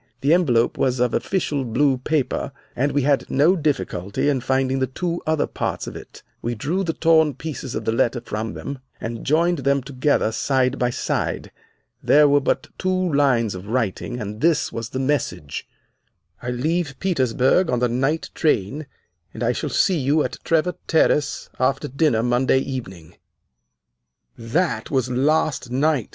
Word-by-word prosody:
The 145 +4 +4
envelope 125 -10 +2
was 130 -1 +1
of 125 -1 +1
official 150 -7 -1
blue 130 +2 +1
paper 150 0 -1 0.2
and 140 +4 +1
we 145 - +1
had 140 0 +1
no 155 +7 +4
difficulty 140 - -1
in 135 -3 0
finding 130 +1 0
the 130 - +1
two 170 +6 -3
other 155 -1 +2
parts - - -3
of - - -7
it. - - -11 0.2
We 120 +1 -2
drew 165 - -1
the 165 -3 -1
torn 160 -4 +3
pieces 140 -3 -6
of - - -4
the - - +1
letter 120 +2 +1
from 110 -1 -5
them 140 -1 -6 0.2
and 115 0 -5
joined 165 +3 +2
them 140 0 +1
together 135 -3 +1
side 130 +3 0
by 125 - +2
side. - - -2 0.5
There 150 0 +5
were 145 0 +4
but - - -1
two 185 -2 0
lines 125 -7 +2
of 95 +1 -8
writing, 120 +1 -2
and 105 0 -6
this 165 -1 +2
was 115 0 -4
the - - -5
message: 120 - -2 0.7
'I 125 - -4
leave 145 +4 -1
Petersburg 135 -1 +2
on 125 - +1
the 125 +1 +2
night 135 +7 -1
train, 145 +1 0 0.5
and 110 - -4
I 120 - +2
shall - - -3
see 185 -4 +2
you 145 +3 +2
at - - -5
Trevor 165 +2 +1
Terrace 150 -3 +2
after 135 +1 +1
dinner 135 -4 +1
Monday 125 +2 +2
evening.' 105 - -5 1.2
"'That 155 +11 -1
was 130 -3 0
last 140 0 +1
night! 135 -1 +1
135 Hz, 165 wpm, -22 LUFS, 120-155 Hz, 1.2 s, There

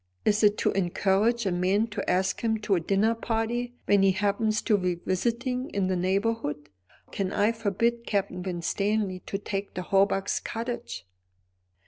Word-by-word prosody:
Is 210 0 +3
it 205 0 +5
to - - +1
encourage 195 +5 +1
a 190 - +1
man 185 +5 +2
to 210 - -4
ask 190 +1 +1
him 225 -1 +1
to 210 - 0
a 180 - +3
dinner 195 +6 +2
party, 230 +2 -2
when 200 -1 +4
he 195 -1 +4
happens 210 +2 0
to 215 - +3
be 180 -3 0
visiting 240 +9 -2
in 190 -2 +1
the 185 - +1
neighbourhood? 185 -5 -1 0.4
Can 195 -1 -2
I 210 +2 +2
forbid 230 +2 -1
Captain 190 -3 -1
Winstanley 190 +2 -1
to 195 - -2
take 200 0 -5
the 180 - -3
Hawbucks' 195 +1 +1
cottage?" 230 - -5
200 Hz, 160 wpm, -27 LUFS, 190-225 Hz, 0.4 s, it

